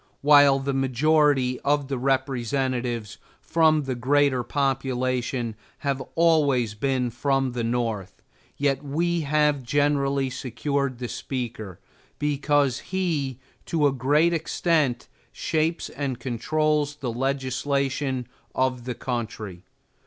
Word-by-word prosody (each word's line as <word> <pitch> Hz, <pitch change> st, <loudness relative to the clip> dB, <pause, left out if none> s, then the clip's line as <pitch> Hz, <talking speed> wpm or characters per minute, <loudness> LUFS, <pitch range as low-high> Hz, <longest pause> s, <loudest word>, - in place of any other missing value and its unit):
While 145 Hz, -1 st, +7 dB
the 135 Hz, 0 st, -2 dB
majority 135 Hz, 0 st, +2 dB
of 145 Hz, -1 st, +1 dB
the 135 Hz, -2 st, -3 dB
representatives, 130 Hz, -3 st, -1 dB, 0.2 s
from 160 Hz, -2 st, +3 dB
their 135 Hz, -1 st, -2 dB
greater 130 Hz, +1 st, +2 dB
population, 130 Hz, -3 st, -1 dB, 0.3 s
have 140 Hz, -1 st, 0 dB
always 145 Hz, -9 st, +3 dB
been 125 Hz, +2 st, -1 dB
from 135 Hz, +2 st, 0 dB
the 120 Hz, -1 st, -3 dB
North, 115 Hz, -5 st, -2 dB, 0.4 s
yet 140 Hz, -1 st, 0 dB
we 170 Hz, +4 st, 0 dB
have 150 Hz, -1 st, +2 dB
generally 140 Hz, 0 st, +1 dB
secured 135 Hz, +1 st, -2 dB
the 125 Hz, 0 st, -4 dB
Speaker, 115 Hz, -8 st, -5 dB, 0.4 s
because 145 Hz, -2 st, +1 dB
he, 160 Hz, -9 st, -2 dB, 0.3 s
to 160 Hz, -3 st, +1 dB
a 140 Hz, -, +4 dB
great 145 Hz, +6 st, +2 dB
extent, 160 Hz, -5 st, 0 dB, 0.2 s
shapes 160 Hz, +1 st, -1 dB
and 135 Hz, -3 st, -4 dB
controls 145 Hz, +5 st, 0 dB
the 130 Hz, -5 st, -4 dB
legislation 135 Hz, 0 st, -1 dB, 0.3 s
of 130 Hz, -2 st, 0 dB
the 125 Hz, -1 st, -3 dB
country. 110 Hz, -7 st, -5 dB
135 Hz, 110 wpm, -25 LUFS, 125-145 Hz, 0.4 s, While